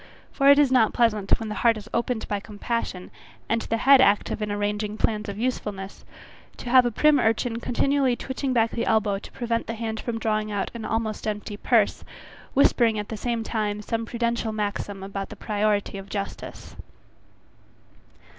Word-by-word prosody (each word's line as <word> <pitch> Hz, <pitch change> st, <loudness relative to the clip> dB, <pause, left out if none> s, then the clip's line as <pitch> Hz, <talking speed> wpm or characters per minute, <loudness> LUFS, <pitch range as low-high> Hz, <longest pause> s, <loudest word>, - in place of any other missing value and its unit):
For 275 Hz, 0 st, +3 dB
it 280 Hz, -, +8 dB
is 290 Hz, -3 st, +4 dB
not 245 Hz, -4 st, +3 dB
pleasant 215 Hz, -5 st, +2 dB
when 225 Hz, -, -5 dB
the -, -, -3 dB
heart 230 Hz, -2 st, +4 dB
is 210 Hz, 0 st, -9 dB
opened 235 Hz, -1 st, -1 dB
by 205 Hz, -, -1 dB
compassion, 205 Hz, -2 st, -4 dB, 0.4 s
and 230 Hz, 0 st, 0 dB
the 230 Hz, -, -1 dB
head 270 Hz, +2 st, +6 dB
active 205 Hz, 0 st, +2 dB
in 210 Hz, -1 st, -2 dB
arranging 205 Hz, +1 st, -2 dB
plans 215 Hz, -1 st, 0 dB
of 200 Hz, -, -6 dB
usefulness, 210 Hz, -5 st, -4 dB, 0.5 s
to 245 Hz, -, -6 dB
have 255 Hz, -1 st, +7 dB
a -, -, -1 dB
prim 300 Hz, +5 st, +4 dB
urchin 225 Hz, 0 st, +1 dB
continually 265 Hz, +1 st, +1 dB
twitching 265 Hz, +2 st, -3 dB
back 230 Hz, -2 st, +2 dB
the 235 Hz, -, -2 dB
elbow 210 Hz, -3 st, +2 dB
to -, -, -12 dB
prevent 235 Hz, -1 st, -2 dB
the 230 Hz, -, -3 dB
hand 220 Hz, -1 st, -4 dB
from 235 Hz, -2 st, -3 dB
drawing 215 Hz, -1 st, -1 dB
out 205 Hz, -1 st, -2 dB
an 230 Hz, -2 st, -6 dB
almost 220 Hz, -1 st, -2 dB
empty 210 Hz, 0 st, -4 dB
purse, -, -, +2 dB, 0.5 s
whispering 235 Hz, -5 st, +4 dB
at 210 Hz, 0 st, -4 dB
the 225 Hz, -, -4 dB
same 230 Hz, +1 st, -2 dB
time 210 Hz, -2 st, -2 dB
some 230 Hz, +1 st, -3 dB
prudential 235 Hz, -1 st, -1 dB
maxim 205 Hz, -2 st, -3 dB
about 195 Hz, 0 st, -5 dB
the -, -, -9 dB
priority 205 Hz, -1 st, -1 dB
of 195 Hz, +1 st, -11 dB
justice. 200 Hz, -1 st, -6 dB
220 Hz, 180 wpm, -25 LUFS, 210-235 Hz, 0.5 s, it